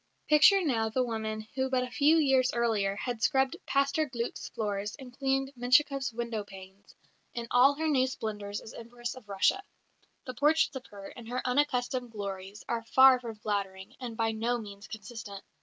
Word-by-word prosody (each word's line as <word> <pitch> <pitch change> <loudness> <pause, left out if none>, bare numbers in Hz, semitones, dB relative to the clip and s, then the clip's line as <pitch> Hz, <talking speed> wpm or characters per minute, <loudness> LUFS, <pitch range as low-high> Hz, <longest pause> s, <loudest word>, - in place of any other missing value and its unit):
Picture 365 +6 +6
now 225 -6 +1
the 255 +3 +1
woman 220 -2 -3
who 265 0 -1
but 255 -1 +1
a 250 - -6
few 295 +5 +4
years 270 -4 +3
earlier 220 -5 +1
had 240 +1 -4
scrubbed 265 0 +2
Pastor 280 +3 +1
Glück's 235 -2 -4
floors 205 -1 -3
and 255 -3 -12
cleaned 270 0 0
Menshikoff's 265 +2 +2
window 230 -2 -3
panes, 195 0 -14 0.4
in 235 -1 -3
all 265 +3 +5
her 320 +2 -1
new 265 -4 +3
splendours 210 -4 -5
as 220 - -11
Empress 240 +1 -6
of 255 -5 -14
Russia. 200 - +2 0.6
The 255 - -5
portraits 300 +2 +2
of 260 - -7
her, 200 -1 -10
in 235 -2 -11
her 250 +2 -3
unaccustomed 250 -2 0
glories, 200 -2 -7
are 235 -1 -1
far 260 +3 +6
from 230 -3 -7
flattering 200 -3 -4
and 240 -4 -6
by 225 -1 +1
no 230 +2 -1
means 205 -3 -9
consistent. 220 -2 -8
240 Hz, 175 wpm, -29 LUFS, 215-265 Hz, 0.6 s, Picture